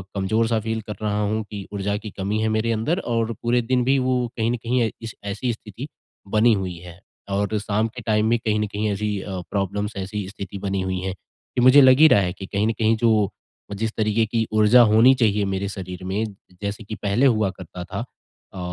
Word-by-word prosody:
कमज़ोर-सा 110 Hz, +4 st, +1 dB
feel 110 Hz, +1 st, -3 dB
कर 105 Hz, -, -5 dB
रहा 105 Hz, 0 st, 0 dB
हूँ 110 Hz, +1 st, -1 dB
कि 100 Hz, -2 st, -6 dB
ऊर्जा 100 Hz, 0 st, -1 dB
की 105 Hz, 0 st, -7 dB
कमी 100 Hz, +3 st, -1 dB
है 110 Hz, -, +1 dB
मेरे 110 Hz, +1 st, 0 dB
अंदर, 130 Hz, -, 0 dB
और 115 Hz, -4 st, -1 dB
पूरे 120 Hz, +1 st, +2 dB
दिन 125 Hz, +1 st, +1 dB
भी 135 Hz, +2 st, +3 dB
वो 125 Hz, -1 st, +1 dB
कहीं 115 Hz, +1 st, +1 dB
न -, -, 0 dB
कहीं 120 Hz, +2 st, -1 dB
ऐ 110 Hz, -, +1 dB
इस 110 Hz, -, -6 dB
ऐसी 115 Hz, +4 st, -2 dB
स्थिति 110 Hz, +5 st, -9 dB, 0.5 s
बनी 110 Hz, +2 st, +5 dB
हुई 95 Hz, -4 st, -3 dB
है। 90 Hz, +1 st, -12 dB, 0.3 s
और 100 Hz, +2 st, 0 dB
शाम 105 Hz, +2 st, 0 dB
के 120 Hz, +2 st, -9 dB
टाइम 105 Hz, -1 st, +2 dB
में 120 Hz, -, +3 dB
कहीं 105 Hz, -1 st, 0 dB
न 105 Hz, -, 0 dB
कहीं 105 Hz, +1 st, -2 dB
ऐसी 105 Hz, 0 st, -2 dB
अ, 95 Hz, -2 st, -5 dB
प्रॉब्लम्स, 100 Hz, +1 st, -2 dB
ऐसी 95 Hz, 0 st, -4 dB
स्थिति 100 Hz, -1 st, -7 dB
बनी 95 Hz, -1 st, -2 dB
हुई 95 Hz, 0 st, -2 dB
है 95 Hz, 0 st, -3 dB
कि 120 Hz, +5 st, -7 dB
मुझे 130 Hz, +3 st, +8 dB
लग 130 Hz, +1 st, +6 dB
ही 160 Hz, -, +9 dB
रहा 105 Hz, -, +5 dB
है 90 Hz, -1 st, -1 dB
कि 95 Hz, -, -8 dB
कहीं 100 Hz, +3 st, 0 dB
न -, -, +2 dB
कहीं 110 Hz, 0 st, +3 dB
जो 110 Hz, -4 st, +3 dB, 0.4 s
जिस 110 Hz, +2 st, -2 dB
तरीके 110 Hz, +1 st, +2 dB
की 110 Hz, 0 st, -1 dB
ऊर्जा 110 Hz, +3 st, +6 dB
होनी 115 Hz, +5 st, +7 dB
चाहिए 105 Hz, -3 st, +2 dB
मेरे 95 Hz, +1 st, -2 dB
शरीर 95 Hz, -2 st, -7 dB
में, 100 Hz, +4 st, -1 dB, 0.4 s
जैसे 100 Hz, +2 st, -4 dB
कि 110 Hz, +1 st, -6 dB
पहले 105 Hz, +7 st, +1 dB
हुआ 110 Hz, -6 st, +3 dB
करता 90 Hz, -1 st, -9 dB
था 95 Hz, +2 st, -6 dB, 0.5 s
अ, 95 Hz, -, -10 dB
105 Hz, 225 wpm, -23 LUFS, 100-115 Hz, 0.5 s, ही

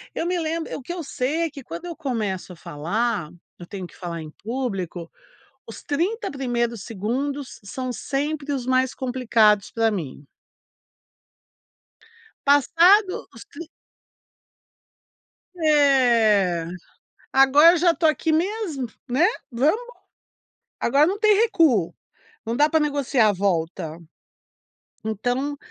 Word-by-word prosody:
eu -, -, -2 dB
me 355 Hz, 0 st, 0 dB
lembro 325 Hz, 0 st, -3 dB
o -, -, -9 dB
que 305 Hz, +7 st, -6 dB
eu 350 Hz, -2 st, -5 dB
sei 280 Hz, +3 st, -2 dB
é 330 Hz, -, -1 dB
que 280 Hz, -, -10 dB
quando 165 Hz, -5 st, -8 dB
eu 345 Hz, -1 st, -6 dB
começo 215 Hz, -, -3 dB
a -, -, -13 dB
falar, 175 Hz, +5 st, -2 dB, 0.3 s
eu 175 Hz, -, -9 dB
tenho 190 Hz, -1 st, -7 dB
que -, -, -14 dB
falar 170 Hz, -2 st, -5 dB
em 155 Hz, -1 st, -9 dB
público, 195 Hz, -8 st, -4 dB, 0.6 s
os 225 Hz, -, -10 dB
30 350 Hz, +11 st, -2 dB
primeiros 240 Hz, -5 st, -2 dB
segundos 260 Hz, +7 st, -4 dB
são 255 Hz, +6 st, -5 dB
sempre 285 Hz, +3 st, -3 dB
os 260 Hz, -3 st, -3 dB
mais 260 Hz, 0 st, +1 dB
complicados 230 Hz, -5 st, +2 dB
pra 225 Hz, -1 st, +1 dB
mim. 150 Hz, -8 st, -6 dB, 2.2 s
Passado 345 Hz, -, +4 dB
os -, -, -11 dB
trin 335 Hz, -4 st, -10 dB, 1.9 s
Eh, 240 Hz, -, +3 dB, 0.7 s
agora 270 Hz, +5 st, +7 dB
eu -, -, +1 dB
já 345 Hz, +1 st, +4 dB
estou 330 Hz, +1 st, +1 dB
aqui 310 Hz, +1 st, +1 dB
mesmo, 335 Hz, -, -1 dB, 0.2 s
né, 265 Hz, +8 st, +3 dB, 0.3 s
vamos 290 Hz, -, +1 dB, 1.0 s
agora 280 Hz, +5 st, +3 dB
não 390 Hz, +3 st, -1 dB
tem 425 Hz, 0 st, +4 dB
recuo, 325 Hz, -, +3 dB, 0.6 s
não 230 Hz, +1 st, -2 dB
dá 295 Hz, +3 st, +5 dB
pra 320 Hz, -, +3 dB
negociar 280 Hz, -6 st, +2 dB
a -, -, +3 dB
volta 165 Hz, -4 st, -2 dB, 1.1 s
então 245 Hz, +7 st, -2 dB
260 Hz, 125 wpm, -23 LUFS, 210-310 Hz, 2.2 s, agora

